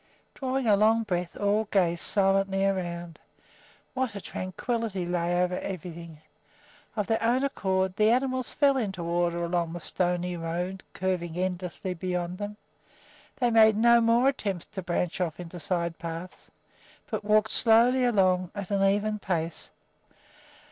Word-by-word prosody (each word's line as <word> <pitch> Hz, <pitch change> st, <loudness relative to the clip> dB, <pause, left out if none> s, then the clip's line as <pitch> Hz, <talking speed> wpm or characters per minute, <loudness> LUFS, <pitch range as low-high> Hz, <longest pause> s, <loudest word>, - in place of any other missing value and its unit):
Drawing 265 Hz, -1 st, -2 dB
a 210 Hz, -2 st, +5 dB
long 220 Hz, +2 st, +3 dB
breath, 180 Hz, -4 st, -3 dB
all 205 Hz, +2 st, +1 dB
gazed 175 Hz, -5 st, +1 dB
silently 195 Hz, -1 st, +2 dB
around. 175 Hz, -3 st, -3 dB, 0.7 s
What 255 Hz, -5 st, -2 dB
a -, -, -4 dB
tranquillity 195 Hz, +1 st, -3 dB
lay 175 Hz, 0 st, 0 dB
over 180 Hz, 0 st, -1 dB
everything! 170 Hz, -3 st, -7 dB, 0.8 s
Of 210 Hz, -2 st, 0 dB
their 225 Hz, +3 st, 0 dB
own 240 Hz, +4 st, +2 dB
accord 190 Hz, -8 st, 0 dB
the 215 Hz, 0 st, +4 dB
animals 255 Hz, +1 st, +1 dB
fell 280 Hz, -2 st, +3 dB
into 195 Hz, -7 st, -3 dB
order 170 Hz, 0 st, 0 dB
along 170 Hz, -1 st, -1 dB
the 175 Hz, -, -5 dB
stony 180 Hz, 0 st, -1 dB
road 175 Hz, +3 st, -4 dB
curving 180 Hz, -3 st, -2 dB
endlessly 180 Hz, 0 st, -3 dB
beyond 180 Hz, 0 st, -3 dB
them. 205 Hz, 0 st, -5 dB, 0.8 s
They 245 Hz, -2 st, +1 dB
made 220 Hz, -1 st, +6 dB
no 235 Hz, +1 st, +5 dB
more 230 Hz, +3 st, +4 dB
attempts 200 Hz, -10 st, -1 dB
to 200 Hz, -3 st, -7 dB
branch 175 Hz, 0 st, -2 dB
off 170 Hz, -2 st, -2 dB
into 175 Hz, 0 st, -8 dB
side 170 Hz, +1 st, -2 dB
paths, 170 Hz, +2 st, -7 dB, 0.6 s
but -, -, -2 dB
walked 215 Hz, +1 st, +3 dB
slowly 240 Hz, +3 st, +5 dB
along 185 Hz, -6 st, +2 dB
at 200 Hz, -1 st, -6 dB
an 200 Hz, -1 st, +2 dB
even 205 Hz, +2 st, +1 dB
pace. 165 Hz, -4 st, -3 dB
190 Hz, 145 wpm, -27 LUFS, 175-220 Hz, 0.8 s, made